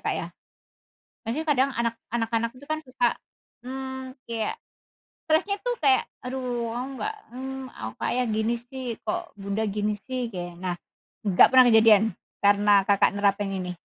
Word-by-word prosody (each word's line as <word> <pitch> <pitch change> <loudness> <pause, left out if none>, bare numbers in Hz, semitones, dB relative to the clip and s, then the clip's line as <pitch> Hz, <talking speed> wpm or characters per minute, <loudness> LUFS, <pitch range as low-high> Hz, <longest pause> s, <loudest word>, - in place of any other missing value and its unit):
Kak, - - -1
ya? - - -3 1.0
Maksudnya 250 +8 -2
kadang 275 -2 +3
anak 235 -1 +1 0.2
anak-anak 230 0 0
itu 285 - -13
kan 310 +1 -2
suka, 255 -4 0 0.5
mmm, 265 +1 -6
kayak 225 -2 -2 0.7
stresnya 400 +6 +2
itu - - -2
kayak, 265 -2 +5 0.2
"Aduh, 250 -2 -3
oh 245 +2 -3
enggak, 430 +10 -3 0.2
hmm, 265 0 -5
aku 110 +1 -6
kayak 250 0 0
gini 220 +2 +1
sih? 245 0 -6
Kok 215 - -3
Bunda 200 +2 -2
gini 210 +1 0
sih," 255 -3 -3
kayk 175 -2 -6
nah, 180 0 -3 0.5
enggak 185 - +7
pernah 260 -1 +8
kejadian 220 -2 +7 0.4
karena 205 +1 +4
Kakak 200 -1 +4
nerapin 200 0 +1
ini? 185 -2 -3
235 Hz, 150 wpm, -26 LUFS, 205-260 Hz, 1.0 s, pernah